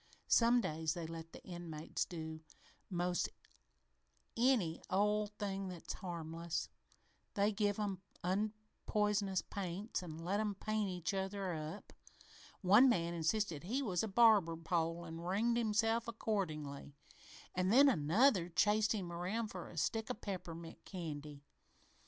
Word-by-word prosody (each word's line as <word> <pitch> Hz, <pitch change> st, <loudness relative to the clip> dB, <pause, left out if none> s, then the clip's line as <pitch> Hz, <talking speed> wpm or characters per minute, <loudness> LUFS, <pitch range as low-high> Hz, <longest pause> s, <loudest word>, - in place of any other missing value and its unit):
Some 240 Hz, +1 st, +5 dB
days 160 Hz, -4 st, -1 dB
they 170 Hz, -2 st, -4 dB
let 165 Hz, 0 st, -7 dB
the -, -, -12 dB
inmates 170 Hz, -3 st, -4 dB
do 160 Hz, -2 st, -6 dB, 0.5 s
'most 175 Hz, -1 st, 0 dB, 1.1 s
any 230 Hz, -9 st, +2 dB
old 210 Hz, +2 st, +2 dB
thing 195 Hz, -1 st, -2 dB
that's 180 Hz, -3 st, -6 dB
harmless. 170 Hz, -2 st, -4 dB, 0.7 s
They 205 Hz, +1 st, +3 dB
even 215 Hz, -, -4 dB
give 205 Hz, -1 st, +1 dB
'em 200 Hz, -3 st, -2 dB, 0.2 s
unpoisonous 210 Hz, 0 st, 0 dB
paints 195 Hz, +2 st, -4 dB
an' 160 Hz, -3 st, -7 dB
let 180 Hz, +5 st, -1 dB
'em 210 Hz, -2 st, 0 dB
paint 215 Hz, 0 st, -1 dB
each 180 Hz, 0 st, -2 dB
other 195 Hz, -1 st, -2 dB
up. 155 Hz, +5 st, -6 dB, 0.7 s
One 210 Hz, +8 st, +7 dB
man 170 Hz, -6 st, +1 dB
insisted 170 Hz, -1 st, 0 dB
he 255 Hz, +8 st, 0 dB
was 185 Hz, -8 st, 0 dB
a 220 Hz, -, -1 dB
barber 205 Hz, -6 st, +5 dB
pole 165 Hz, 0 st, -1 dB
an' 165 Hz, 0 st, -7 dB
ringed 210 Hz, +7 st, +1 dB
himself 225 Hz, 0 st, +2 dB
accordingly, 155 Hz, -11 st, -3 dB, 0.6 s
an' 185 Hz, 0 st, +1 dB
then 270 Hz, +7 st, +7 dB
another 190 Hz, -, +4 dB
chased 210 Hz, +5 st, +3 dB
him 185 Hz, -5 st, -3 dB
around 190 Hz, +6 st, -2 dB
for 180 Hz, -3 st, -7 dB
a 165 Hz, -, -11 dB
stick 220 Hz, +8 st, 0 dB
of -, -, -3 dB
peppermint 170 Hz, -4 st, -6 dB
candy. 150 Hz, -5 st, -6 dB
190 Hz, 135 wpm, -36 LUFS, 165-215 Hz, 1.1 s, One